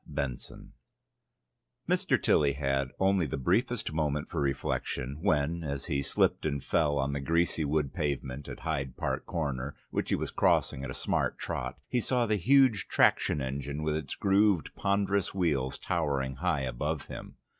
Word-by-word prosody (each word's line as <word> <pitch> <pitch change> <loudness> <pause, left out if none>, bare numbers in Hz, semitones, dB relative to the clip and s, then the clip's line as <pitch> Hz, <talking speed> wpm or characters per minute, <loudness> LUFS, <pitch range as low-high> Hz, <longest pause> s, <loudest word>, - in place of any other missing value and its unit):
Tilly's 70 -4 -2
Seance - - -12 1.2
Mr. - - +2
Tilly 70 -2 +3
had 70 -1 0
only 95 -3 +3
the 65 - -3
briefest 105 - 0
moment 75 -2 -1
for 80 - -2
reflection, 70 0 -2
when, 85 -2 +1
as 70 -2 -4
he 70 -1 0
slipped 70 - +1
and 70 -3 -2
fell 75 -3 +2
on 70 0 0
the 70 - -1
greasy 85 +3 +1
wood 75 -2 0
pavement 70 -4 -3
at - - -8
Hyde 70 -5 -3
Park - - -2
Corner, 70 -4 -3 0.2
which - - -2
he - - +3
was - - -3
crossing 65 - +2
at 70 - -4
a 65 - -5
smart - - 0
trot, - - -4
he 125 - 0
saw 120 +1 +1
the 105 -1 +1
huge 130 +1 +4
traction 70 - +3
engine 70 +3 -4
with 75 0 0
its 75 -3 -3
grooved 100 -3 +2
ponderous 100 -1 0
wheels 70 -8 0
towering 70 -5 -1
high 85 -2 0
above 65 -2 -2
him. - - -9
75 Hz, 165 wpm, -30 LUFS, 70-90 Hz, 1.2 s, huge